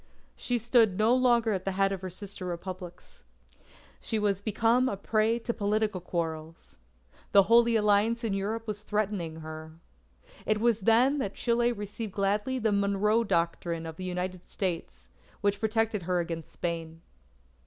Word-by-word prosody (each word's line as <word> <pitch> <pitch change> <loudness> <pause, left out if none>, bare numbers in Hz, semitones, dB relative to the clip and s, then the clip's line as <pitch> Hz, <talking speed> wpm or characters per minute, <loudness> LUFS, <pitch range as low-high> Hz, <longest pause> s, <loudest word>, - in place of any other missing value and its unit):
She 245 - -1
stood 230 -4 +3
no 220 +3 +4
longer 240 -3 +3
at 190 -1 -2
the 195 - -2
head 195 +1 +2
of 195 -2 -4
her 185 - -5
sister 195 +1 -6
Republics. 180 0 -8 0.8
She 220 - -2
was 200 -2 0
become 230 +4 +2
a 200 - -3
prey 220 +3 +1
to 235 0 -3
political 210 -2 0
quarrels. 165 -2 -5 0.6
The 200 - +8
Holy 230 +3 +5
Alliance 215 +2 +3
in 220 -3 0
Europe 215 +4 -2
was 210 -2 -4
threatening 200 -7 -2
her. 155 0 -8 0.7
It 215 0 +1
was 230 -1 +2
then 240 +7 +4
that 200 -6 -3
Chile 240 0 +1
received 205 -1 -6
gladly 205 +6 0
the 220 -3 +1
Monroe 200 +3 +2
Doctrine 170 -3 -1
of 160 -1 -7
the 185 - -6
United 180 0 -4
States, 165 - -4 0.3
which 200 0 +1
protected 220 -1 0
her 180 +1 0
against 165 -2 -4
Spain. 165 -1 -5
200 Hz, 155 wpm, -28 LUFS, 180-225 Hz, 0.8 s, The